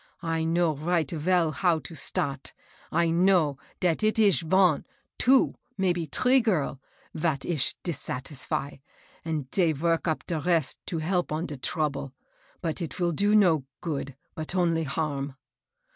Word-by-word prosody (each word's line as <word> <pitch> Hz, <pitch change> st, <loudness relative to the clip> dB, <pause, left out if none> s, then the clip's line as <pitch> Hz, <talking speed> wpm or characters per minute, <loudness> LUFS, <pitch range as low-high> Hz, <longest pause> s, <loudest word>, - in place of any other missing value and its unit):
I 165 Hz, -1 st, -1 dB
know 165 Hz, -1 st, +2 dB
right 160 Hz, +1 st, 0 dB
veil 170 Hz, 0 st, +2 dB
how 165 Hz, +3 st, +2 dB
it 160 Hz, +1 st, -9 dB
start, 140 Hz, -1 st, -2 dB, 0.2 s
— -, -, -27 dB
I 165 Hz, -1 st, +2 dB
know 170 Hz, -5 st, +3 dB, 0.2 s
dat 175 Hz, 0 st, +1 dB
it 215 Hz, +1 st, +2 dB
ish 205 Hz, -5 st, +4 dB
von 175 Hz, -1 st, +3 dB, 0.2 s
— -, -, -49 dB
two 265 Hz, +1 st, +4 dB
— 250 Hz, -, -44 dB
maybe 175 Hz, -4 st, 0 dB
tree 255 Hz, -, +3 dB
girl, 160 Hz, -, 0 dB, 0.3 s
vat 155 Hz, -4 st, -1 dB
ish 155 Hz, -7 st, 0 dB
dissatisfy, 140 Hz, -2 st, -3 dB, 0.5 s
and 155 Hz, -5 st, -3 dB
dey 170 Hz, -5 st, +3 dB
vork 165 Hz, +4 st, 0 dB
up 160 Hz, -, -1 dB
de 165 Hz, -3 st, -1 dB
rest 165 Hz, -2 st, 0 dB
to 170 Hz, -, -2 dB
help 175 Hz, +2 st, -1 dB
on 155 Hz, +3 st, -1 dB
de 145 Hz, -, -6 dB
trouble. 140 Hz, -1 st, -1 dB, 0.5 s
But 165 Hz, +1 st, -2 dB
it 165 Hz, -, -4 dB
vill 175 Hz, -1 st, 0 dB
do 205 Hz, +6 st, +2 dB
no 170 Hz, -9 st, +4 dB, 0.2 s
good, 140 Hz, -5 st, -4 dB, 0.2 s
but 160 Hz, +3 st, -5 dB
only 165 Hz, -3 st, +2 dB
harm. 140 Hz, -2 st, -2 dB
165 Hz, 160 wpm, -27 LUFS, 150-180 Hz, 0.5 s, ish